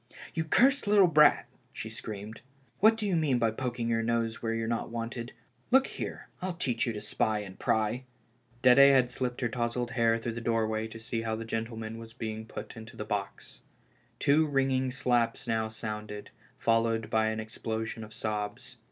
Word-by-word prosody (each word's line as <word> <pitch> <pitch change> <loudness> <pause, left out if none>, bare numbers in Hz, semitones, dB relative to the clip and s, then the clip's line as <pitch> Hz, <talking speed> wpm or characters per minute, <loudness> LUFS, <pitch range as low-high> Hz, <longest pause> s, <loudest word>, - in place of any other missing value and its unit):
"You 160 -1 -1
cursed 265 - +4
little 205 -2 +6
brat," 150 -3 +5 0.3
she - - -6
screamed, 105 +1 -7 0.4
"what 220 +2 +6
do 220 - -2
you 195 -3 +1
mean 150 -6 +2
by 115 -2 +2
poking 120 0 -3
your 115 -1 +1
nose 115 0 -1
where 115 -1 -1
you're 115 0 -2
not 115 0 -2
wanted? 115 +1 -4 0.4
Look 265 +2 +5
here, - - -6
I'll 185 -1 -3
teach 125 -9 0
you 115 - -1
to 105 - -5
spy 110 +1 0
and 95 -2 -10
pry." 110 +4 0 0.6
Dede 125 +1 +7
had 135 -3 +7
slipped 125 0 -3
her 120 - +2
touzled 120 +1 -2
head 115 -1 +2
through 120 - -1
the 115 +1 -5
door 115 -1 +1
way 110 0 -2
to 115 0 -10
see 115 0 -3
how 110 -1 -2
the 115 +1 -5
gentleman 115 0 -4
was 115 0 -10
being 110 -1 -5
put - - -8
into 110 0 -11
the 105 - -4
box. 105 -2 -5 0.6
Two 155 +3 +3
ringing 135 -2 +1
slaps 120 -2 0
now 110 -2 0
sounded, 105 -1 -6 0.3
followed 115 -1 +1
by 110 0 +3
an 110 0 -1
explosion 110 +1 -4
of 105 - -11
sobs. 110 +3 -4
115 Hz, 185 wpm, -30 LUFS, 110-125 Hz, 0.6 s, Dede